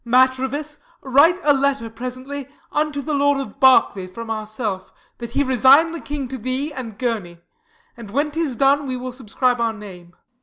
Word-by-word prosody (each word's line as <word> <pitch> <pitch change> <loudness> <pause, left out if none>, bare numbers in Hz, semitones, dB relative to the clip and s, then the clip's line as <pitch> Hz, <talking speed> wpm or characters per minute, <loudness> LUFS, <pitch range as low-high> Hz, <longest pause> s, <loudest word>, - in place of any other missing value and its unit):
Matrevis, 260 +4 +1 0.2
write 285 +7 +4
a 295 - +5
letter 275 -3 0
presently 255 +4 -7 0.2
Unto 295 -1 -1
the 305 - -3
Lord 285 0 +2
of 275 0 -7
Berkeley 255 -8 +4
from 225 +5 -7
ourself, 215 -3 -4 0.3
That 235 -1 -7
he 285 - +2
resign 265 +5 +5
the 335 - -5
king 285 -2 -4
to 260 0 -6
thee 260 +6 -3
and 235 -6 -7
Gurney; 210 -9 -3 0.6
And, 230 -3 -10
when 285 +7 0
'tis 310 -4 -2
done, 275 +3 +2
we 255 -1 -3
will 255 0 -6
subscribe 245 0 0
our 230 -1 +1
name. 185 -5 -12
260 Hz, 175 wpm, -21 LUFS, 230-285 Hz, 0.6 s, a